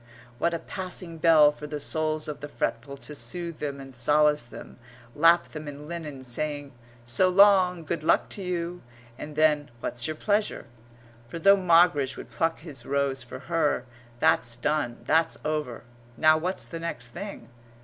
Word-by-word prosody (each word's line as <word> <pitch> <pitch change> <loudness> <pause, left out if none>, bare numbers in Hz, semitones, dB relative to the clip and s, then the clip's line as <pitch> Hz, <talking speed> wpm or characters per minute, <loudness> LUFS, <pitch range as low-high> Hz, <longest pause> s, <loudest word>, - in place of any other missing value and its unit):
what 170 - +2
a 170 - -1
passing 180 -2 -5
bell 155 -2 +6
for 150 0 -9
the 150 0 -5
souls 155 +1 -1
of 150 - -5
the 145 - -7
fretful 140 +1 -3
to 150 - -8
soothe 160 +6 -5
them 140 -2 -4
and 135 -1 -10
solace 150 +5 +3
them, 120 +1 -12 0.3
lap 165 +4 +4
them 155 -1 -8
in 145 +1 -8
linen, 155 -5 -7
saying, 145 +3 -3 0.3
"So 120 +11 +3
long. 185 -2 +5
Good 160 0 -3
luck - - +3
to 200 - -4
you!" 175 -1 -3 0.4
and 150 0 -7
then, 150 -1 +2
"What's 120 0 -3
your 155 - -3
pleasure?" 205 +5 -1 0.6
for 125 - -7
though 195 +4 +6
Moggridge 170 -7 +3
would - - -10
pluck 165 0 -1
his 145 -7 -8
rose 140 -1 -1
for 130 +2 -9
her, 155 -6 0 0.3
that's 120 0 +2
done, 120 -2 -2
that's 160 +4 +2
over. 150 -7 -3 0.3
Now 155 +4 +5
what's 180 +4 -1
the 165 - -7
next 125 -8 -5
thing? 200 +4 -8
155 Hz, 170 wpm, -26 LUFS, 140-170 Hz, 0.6 s, bell